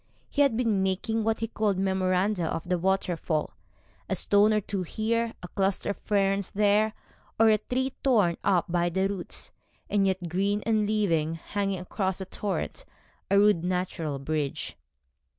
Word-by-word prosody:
He 290 - +1
had 275 -6 +3
been 225 -5 +1
making 200 +4 0
what 225 0 0
he 225 - 0
called 215 -3 0
memoranda 190 0 +1
of 165 - -4
the 180 -1 +1
waterfall, 175 -4 0 0.6
a - - +1
stone 205 +1 +4
or 215 - +3
two 200 -1 -3
here, 225 +5 -1
a - - -5
cluster 195 0 0
of - - -6
ferns 195 -1 +1
there, 210 +1 +2 0.5
or 225 0 +6
a 215 -1 +4
tree 260 +4 -2
torn 210 -11 +3
up 185 -4 +3
by 175 0 +1
the 190 +3 +1
roots, 195 -3 -4 0.4
and 200 -1 +3
yet 190 -2 -1
green 200 +4 0
and 215 -2 +2
living, 165 -7 +1
hanging 195 +3 -2
across 190 +1 -2
the 190 - -4
torrent, 205 - -3 0.5
a 200 - +4
rude 205 -4 +4
natural 180 -5 -2
bridge. 145 0 -3
195 Hz, 165 wpm, -27 LUFS, 180-215 Hz, 0.6 s, or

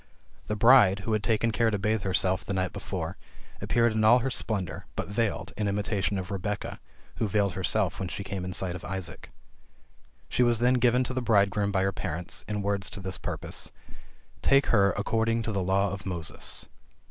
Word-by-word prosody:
The 105 - -1
bride, 105 -4 +6
who 110 +3 -2
had 110 - +1
taken 115 +1 +1
care 115 +1 +2
to 105 - 0
bathe 110 +2 0
herself 95 0 +1
the 100 - -3
night 95 -2 -1
before, - - -4 0.4
appeared 120 -1 +2
in 110 0 0
all 115 +3 +7
her 135 +2 -1
splendor, 95 -9 -3
but - - -3
veiled, 100 -5 -1
in 105 - -1
imitation 100 0 0
of 95 0 -5
Rebecca, 100 +1 -3 0.4
who 110 - 0
veiled 100 -1 +1
herself 95 -1 0
when 95 - -2
she 100 - -4
came 95 -1 -4
in 90 - -4
sight 90 0 -2
of 90 - -8
Isaac. 95 -2 -4 1.0
She - - 0
was 120 -1 +4
then 125 +3 +3
given 125 +1 +4
to 130 - -4
the 130 - -1
bridegroom 100 -3 +2
by 95 -2 +1
her 95 - +1
parents, 85 -2 -4
in 105 -1 -2
words 100 0 -1
to - - -6
this 95 -2 -4
purpose: - - -5 0.7
"Take 135 0 +4
her 100 -3 +5
according 115 +2 0
to 110 - -2
the 100 -2 -1
law 95 +1 +1
of 100 0 -6
Moses." 85 -4 -4
100 Hz, 195 wpm, -28 LUFS, 95-110 Hz, 1.0 s, all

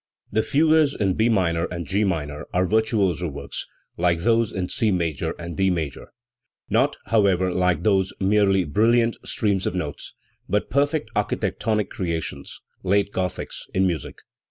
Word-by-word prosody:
* - - -40
The - - +5
fugues 155 +2 +3
in 95 -2 +1
B 110 +5 +2
minor 85 -6 +1
and 85 -1 -5
*G 100 +2 +1
minor 75 -7 -2
are 90 +1 +3
virtuoso 100 -4 +1
works, 70 -2 -6 0.3
like 85 -1 +1
those 115 +2 +2
in 90 -2 -2
C 110 - 0
major 85 -7 -1
and 85 0 -7
D 95 0 +2
major, 80 -6 -3 0.6
not, - - +2
however, 95 -4 +2
like 90 -2 +1
those, 95 -2 +2
merely 95 -1 +3
brilliant 115 +8 +2
streams 100 -3 0
of - - -2
notes, 75 -5 -5 0.3
but 105 - 0
perfect 140 -3 +1
archi 105 - +1
tectonic 105 +2 -1
creations, 80 -6 -4 0.2
late 100 +2 +1
Gothics 90 -1 -4
in 95 +1 +3
music. 85 -7 -2
95 Hz, 155 wpm, -23 LUFS, 85-110 Hz, 0.6 s, The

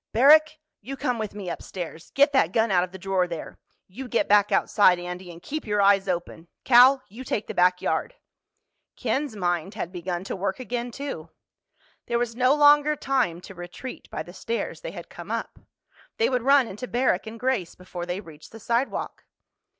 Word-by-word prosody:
"Barrack, 305 +6 +6 0.2
you 275 +2 -7
come 250 -4 -1
with 215 -2 -4
me 200 -3 -7
upstairs! 170 -1 -7
Get 285 +1 +4
that 180 -11 +3
gun 225 +1 +2
out 180 -2 +4
of 180 - -6
the 190 - -9
drawer 190 -1 0
there. 170 -2 -7 0.3
You 250 +8 -8
get 235 - 0
back 205 0 +4
outside, 185 -4 +4
Andy—and 175 -1 -8
keep 310 -4 -5
your 210 0 0
eyes 200 -1 +4
open. 175 -2 -4 0.2
Cal, 255 +2 +6
you 230 +6 -10
take 220 -4 -2
the - - -6
back 180 0 +3
yard." - - -1 0.8
Ken's 275 -4 -2
mind 175 -1 -2
had 170 - -4
begun 175 0 -4
to - - -5
work 195 +2 -3
again 245 0 -4
too. 240 - -6 0.8
There 235 - 0
was 235 -1 -2
no 255 +3 +3
longer 295 0 +5
time 255 - 0
to 195 - -11
retreat 175 +8 -9
by - - -4
the - - -13
stairs 470 +1 -4
they - - -5
had - - -9
come - - -11
up. - - -4 0.6
They 455 - +2
would 250 -1 +1
run 275 +1 +5
into 215 +6 -7
Barrack 240 -5 0
and 225 +1 -8
Grace 250 -9 -1
before 180 -1 -8
they 180 +2 -3
reached 155 -5 -14
the 225 - -11
sidewalk. 235 +4 -2
215 Hz, 190 wpm, -25 LUFS, 180-260 Hz, 0.8 s, Barrack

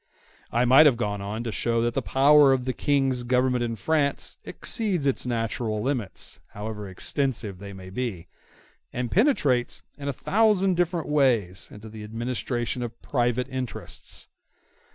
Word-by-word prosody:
I 120 +2 +2
might 135 +5 +8
have 130 -5 +3
gone 105 -3 -2
on 105 +3 -4
to 115 - -3
show 115 +1 0
that 120 0 0
the - - 0
power 140 +1 +5
of 125 -2 -1
the 130 - -1
King's 135 -3 +1
government 125 0 +1
in 115 -1 -2
France 145 +6 0
exceeds 195 - 0
its 135 -2 0
natural 115 -2 -1
limits, 120 -5 -3
however 105 -1 -6
extensive 110 -1 -2
they 100 0 -8
may 95 -1 -10
be, 100 -6 -4 0.6
and 125 -1 -3
penetrates 150 - +2 0.2
in 140 - -5
a - - +1
thousand 195 - +2
different 175 -2 0
ways 120 -11 +1
into 105 +2 -10
the 110 0 -9
administration 120 +2 -3
of 120 -1 -6
private 125 -1 0
interests. 130 -2 -6
125 Hz, 155 wpm, -26 LUFS, 110-140 Hz, 0.6 s, might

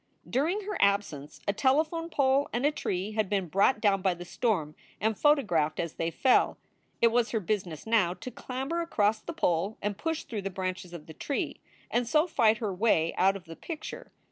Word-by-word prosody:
During 330 +11 0
her 410 -1 -4
absence 200 -8 0
a 200 - +2
telephone 310 +8 +1
pole 275 -2 +2
and 240 +4 -1
a 295 - +4
tree 190 -8 -3
had 215 -2 -1
been 195 -3 0
brought 200 - +3
down 200 -3 +2
by 185 -2 +1
the 175 +1 -9
storm 175 -8 -1 0.3
and 220 0 +1
photographed 205 - +2
as 165 -2 -2
they 165 - -2
fell. 255 +9 +3 0.5
It 230 - +7
was 235 0 +2
her 225 - 0
business 180 -5 -3
now 210 -6 +2
to 255 - -8
clamber 270 +9 -3
across 215 -10 +1
the - - -7
pole 195 - 0
and 205 0 -2
push 325 -1 -2
through 215 -3 -5
the 195 - -3
branches 185 -1 -4
of 170 -3 -9
the 160 - -10
tree, 280 - -3 0.3
and 240 0 +1
so 305 +3 +4
fight 225 -10 +3
her 215 -3 -2
way 180 -5 +2
out 195 +2 +3
of 190 -2 -9
the 165 0 -9
picture. 320 - -7
215 Hz, 200 wpm, -29 LUFS, 185-265 Hz, 0.5 s, It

